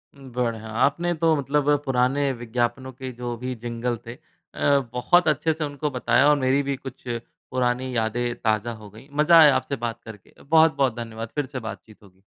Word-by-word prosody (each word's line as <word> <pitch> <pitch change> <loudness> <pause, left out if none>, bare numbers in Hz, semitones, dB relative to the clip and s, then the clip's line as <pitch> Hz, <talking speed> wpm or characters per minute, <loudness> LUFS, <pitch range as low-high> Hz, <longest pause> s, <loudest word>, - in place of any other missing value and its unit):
बढ़िया! 120 -5 -4
आपने 145 +10 +1
तो 165 -1 +2
मतलब 145 0 0 0.2
पुराने 135 +2 +1
विज्ञापनों 120 +2 -2
के 130 0 -7
जो 120 0 -5
भी 125 +2 -4
जिंगल 120 +1 -3
थे 115 - -7
अ, 140 +3 -1
बहुत 165 +8 +3
अच्छे 160 +1 +2
से 155 0 -4
उनको 145 +1 -3
बताया 130 +2 +3
और 150 - +5
मेरी 130 +1 +2
भी 140 0 -1
कुछ 135 -1 -10 0.5
पुरानी 125 0 -1
यादें 120 +2 -1
ताज़ा 110 0 0
हो 110 -2 -12
गई। 110 +6 -15
मज़ा 155 +3 +6
आया 150 -3 +7
आपसे 140 - -1
बात 120 -1 -4
करके 105 -3 -13
बहुत-बहुत 155 -5 +3
धन्यवाद 115 -1 -6
फ़िर 145 -2 0
से 130 0 -6
बातचीत 110 -1 -9
होगी। 95 -1 -21
125 Hz, 180 wpm, -24 LUFS, 115-140 Hz, 0.5 s, आया